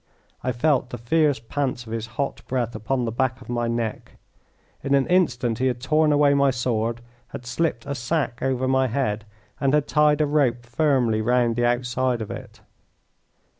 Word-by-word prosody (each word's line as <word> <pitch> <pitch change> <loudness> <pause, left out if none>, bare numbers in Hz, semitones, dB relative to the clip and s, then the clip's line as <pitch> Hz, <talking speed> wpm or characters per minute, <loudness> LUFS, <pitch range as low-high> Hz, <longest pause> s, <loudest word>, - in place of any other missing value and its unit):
I 125 - 0
felt 130 0 +1
the 120 - -6
fierce 145 +4 +2
pants 125 +1 -3
of 110 - -7
his 115 -1 -3
hot 140 -1 -2
breath 120 -3 -1
upon 120 +4 -1
the 115 - -2
back 130 +1 -1
of 125 - -14
my 120 -1 -1
neck. 115 -2 -3 0.7
In 140 0 +2
an 135 -1 +3
instant 125 -11 +1
he 130 - +2
had 125 -2 -1
torn 155 +4 +2
away 145 -1 +4
my 140 -1 +4
sword, 120 -2 -1 0.3
had 125 - -9
slipped 125 -1 -1
a 140 - -3
sack 130 -1 -2
over 130 -1 0
my 130 0 +2
head, 110 -4 -1 0.3
and 135 +1 +2
had 150 -1 +1
tied 150 -1 +3
a 155 - +3
rope 135 -5 +1
firmly 120 -4 +1
round 120 0 +2
the 120 0 +1
outside 125 0 0
of 110 - -5
it. - - -9
125 Hz, 185 wpm, -24 LUFS, 120-140 Hz, 0.7 s, away